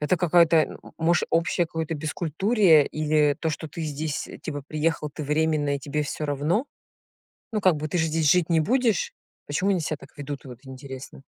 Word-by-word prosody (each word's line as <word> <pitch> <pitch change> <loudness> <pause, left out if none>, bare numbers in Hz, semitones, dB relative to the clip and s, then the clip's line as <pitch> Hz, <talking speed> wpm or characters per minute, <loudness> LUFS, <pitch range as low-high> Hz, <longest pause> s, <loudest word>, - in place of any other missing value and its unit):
это 150 +5 +1
какая-то, 165 -2 +3 0.2
может, 165 +1 +2
общее 170 +1 +1
какое-то 160 0 -3
бескультурие 160 - +3
или 150 -1 +2
то, 160 - 0
что 155 +1 -5
ты 165 +3 -6
здесь, 150 0 -3
типа, 145 -3 -5
приехал 155 -1 -1
ты 150 +1 -6
временно 150 -1 +1
и - - -7
тебе 150 +2 -2
всё 150 +1 -4
равно? 150 - 0 0.9
Ну, 215 - -1
как 185 -3 +4
бы, 155 +1 -3
ты 175 - -2
же 160 -1 +2
здесь 155 -2 +1
жить 180 0 +3
не 165 -1 +4
будешь. 230 - +1 0.3
Почему 185 +7 0
они 185 - +1
себя 155 -1 -2
так - - -14
ведут, 145 0 -6
вот 125 -2 -10
интересно? 130 0 -9
155 Hz, 185 wpm, -25 LUFS, 145-170 Hz, 0.9 s, как